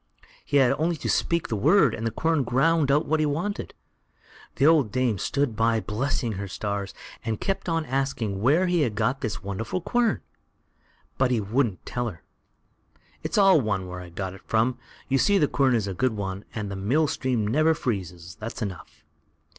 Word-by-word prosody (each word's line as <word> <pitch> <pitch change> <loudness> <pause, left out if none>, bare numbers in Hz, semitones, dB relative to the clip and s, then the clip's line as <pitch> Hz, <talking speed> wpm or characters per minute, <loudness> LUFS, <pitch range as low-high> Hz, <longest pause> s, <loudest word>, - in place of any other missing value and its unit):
He 145 - +1
had 130 -3 +5
only 170 +2 +1
to - - -5
speak 170 -2 0
the 110 - -1
word, 150 - +4
and 115 - -2
the - - +1
quern 160 +5 0
ground 145 +4 +2
out 145 +2 +3
what 160 +1 +1
he 155 - +2
wanted. 175 +8 -3 0.8
The 135 - +2
old 150 -9 +4
dame 120 -4 0
stood 140 0 0
by 115 +1 +2
blessing 115 +2 -2
her 100 0 -4
stars, 100 +1 -4 0.3
and 110 -2 -2
kept 195 -2 -2
on 165 -1 0
asking 125 -7 -2
where 150 - +4
he 175 -2 +2
had 120 -7 0
got 125 +6 0
this 105 -6 -3
wonderful 100 - -3
quern, 235 +4 +1 1.0
but 130 -1 +3
he 125 -2 +1
wouldn't 110 -1 -1
tell 120 -1 -2
her. 85 - -13 1.0
"It's - - -3
all 195 -6 +6
one 100 -5 -1
where 90 0 -7
I 90 - -10
got 95 +2 -5
it 95 - -13
from; 120 +3 +1 0.3
you 135 0 +2
see 205 +6 +4
the 150 - +3
quern 135 -3 +2
is 110 -4 0
a 100 - -3
good 125 +6 0
one, 95 0 -4
and 105 -3 -4
the - - -4
mill 120 +12 +1
stream 130 -6 -1
never 155 +9 +3
freezes, 90 - -4
that's 115 +1 -5
enough." 95 -5 -8
125 Hz, 195 wpm, -25 LUFS, 105-150 Hz, 1.0 s, all